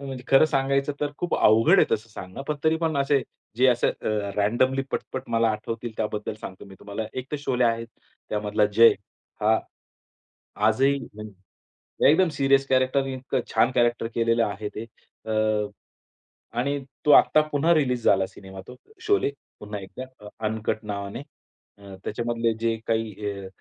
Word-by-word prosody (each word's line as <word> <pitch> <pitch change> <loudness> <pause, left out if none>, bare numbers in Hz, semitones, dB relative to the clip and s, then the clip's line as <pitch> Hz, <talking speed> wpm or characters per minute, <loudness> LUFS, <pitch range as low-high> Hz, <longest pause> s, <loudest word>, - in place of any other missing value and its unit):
अ, 140 - -8
म्हणजे 130 -2 -7
खरं 135 +3 +6
सांगायचं 140 0 0
तर 145 -1 0
खूप 175 - -1
अवघड 115 - +5
आहे - - +5
तसं 110 +1 -7
सांगण. 95 +3 -9
पण 150 - +1
तरी 160 +1 +3
पण 160 -2 -1
असे, 140 0 +2 0.3
जे 130 +1 +4
असे 120 -1 +3
अ, - - -4 0.3
रॅन्डमली 130 +6 +2
पटपट 130 - -4
मला 115 0 +3
आठवतील 115 +2 -5
त्याबद्दल 105 -1 -3
सांगतो 95 +2 -9
मी 95 -1 -13
तुम्हाला. 105 +2 -5
एक 130 0 -6
तर - - 0
शोले 125 -3 0
आहे, 115 0 +1 0.4
त्यामधला 105 0 +1
जय 115 0 +8 0.5
हा, 110 +1 +3 1.1
आजही 135 +2 +3
हं, 110 -4 -9
एकदम 95 -2 -8
एकदम 165 +3 +4
सिरियस 135 0 +3
कॅरक्टर 130 +1 +2
इतकं 130 0 -3
छान - - +3
कॅरक्टर 120 -1 +2
केलेलं 115 0 +2
आहे 105 +1 -4
ते. 110 - -5 0.4
अ, 110 -1 +1 0.9
आणि 140 +2 0 0.3
तो 150 - +5
आत्ता 155 - +6
पुन्हा 155 +4 +3
रीलीज 125 -6 +1
झाला 95 -1 +4
सिनेमा 95 -1 -11
तो 125 - -10 0.3
शोले 405 - +2 0.3
पुन्हा 105 -1 -6
एकदा 95 +7 -8 0.2
अ, - - -8 0.2
अनकट 110 0 -2
नावाने. 100 +3 -5 0.6
अ, 100 -1 -11
त्याच्यामधले 115 +1 -1
जे 115 0 +1
काही 110 -2 -2 0.2
अ, - - -7
115 Hz, 165 wpm, -25 LUFS, 105-135 Hz, 1.1 s, जय